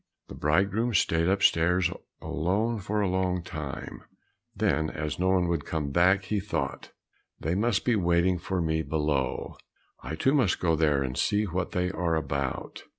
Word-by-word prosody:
The - - -8
bridegroom 100 +9 +1
stayed 80 -2 +2
upstairs 90 -2 +3 0.3
alone 105 +8 0
for 105 +2 -1
a 100 - +1
long 90 -1 0
time; 75 -5 -6 0.5
then 80 0 +1
as 75 -1 -4
no 95 +1 +2
one 90 -2 +3
would 85 -4 -1
come 75 -3 -3
back 95 +5 +4
he 105 +1 -1
thought, 70 -9 -3 0.5
"They 80 - -1
must 105 +2 +1
be 120 - +3
waiting 85 -1 +2
for 90 +1 -2
me 80 0 0
below; 75 -4 -1 0.4
I 80 - -5
too 135 - +2
must 125 -10 +2
go 85 -2 +2
there 75 -3 +2
and 65 -1 -4
see 105 +8 +1
what 90 -2 -3
they 90 0 0
are 85 -3 0
about." 70 -4 -3
90 Hz, 165 wpm, -27 LUFS, 80-95 Hz, 0.5 s, back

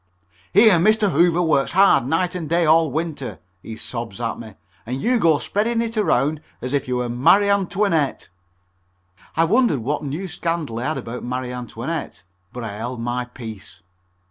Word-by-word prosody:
"Here 205 -3 +6
Mr. 210 +2 +3
Hoover 170 +3 +3
works 150 -3 +1
hard 190 -9 +5
night 175 +4 0
and 170 -5 -5
day 170 +1 +2
all 160 0 +4
winter," 155 -3 -4 0.2
he 110 - -8
sobs 115 -2 -6
at 115 -1 -3
me, 110 -4 -10 0.3
"and 125 +5 -4
you 245 - +1
go 165 -6 +4
spreading 225 +8 -1
it 230 0 -2
around 155 - +1 0.2
as 125 +3 -5
if 140 -3 0
you 125 - -1
were 125 0 -1
Marie 135 +12 +4
Antoinette." 195 -6 0 1.1
I 165 - +5
wondered 210 - +2
what 145 +6 -2
new 150 +7 -4
scandal 165 -9 -3
he 120 - -3
had 155 - -1
about 120 +2 -6
Marie 125 0 -3
Antoinette, 125 - -5 0.3
but 125 - -7
I 105 -2 -6
held 120 +2 -5
my 120 +1 -2
peace. 115 -4 -10
150 Hz, 170 wpm, -21 LUFS, 125-180 Hz, 1.1 s, Here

